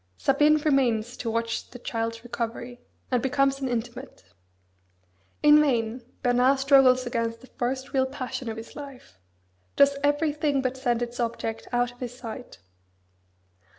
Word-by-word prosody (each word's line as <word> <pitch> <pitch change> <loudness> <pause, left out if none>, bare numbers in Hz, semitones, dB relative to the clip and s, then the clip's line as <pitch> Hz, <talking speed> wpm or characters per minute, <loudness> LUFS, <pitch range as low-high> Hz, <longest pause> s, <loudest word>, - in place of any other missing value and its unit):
Sabine 295 +3 +4
remains 250 -6 +1
to 230 - -3
watch 230 0 -2
the 245 - -10
child's 230 -1 -3
recovery, 240 +1 -5 0.3
and 250 -2 +2
becomes 275 0 +1
an 265 - -1
intimate. 240 - -5 1.2
In 300 0 +8
vain 240 -4 0 0.2
Bernard 250 +2 +4
struggles 270 -2 +5
against 230 -1 -2
the - - -13
first 260 +2 -2
real 265 -1 +2
passion 255 -2 -5
of 220 - -5
his 225 - -9
life; 275 - -11 0.6
does 280 0 +5
everything 290 -1 +1
but 255 0 -1
send 245 -2 0
its 240 +1 -6
object 230 -1 -3
out 245 0 +1
of 245 - -21
his 245 -1 -6
sight. 245 +1 -8
250 Hz, 145 wpm, -26 LUFS, 235-275 Hz, 1.2 s, In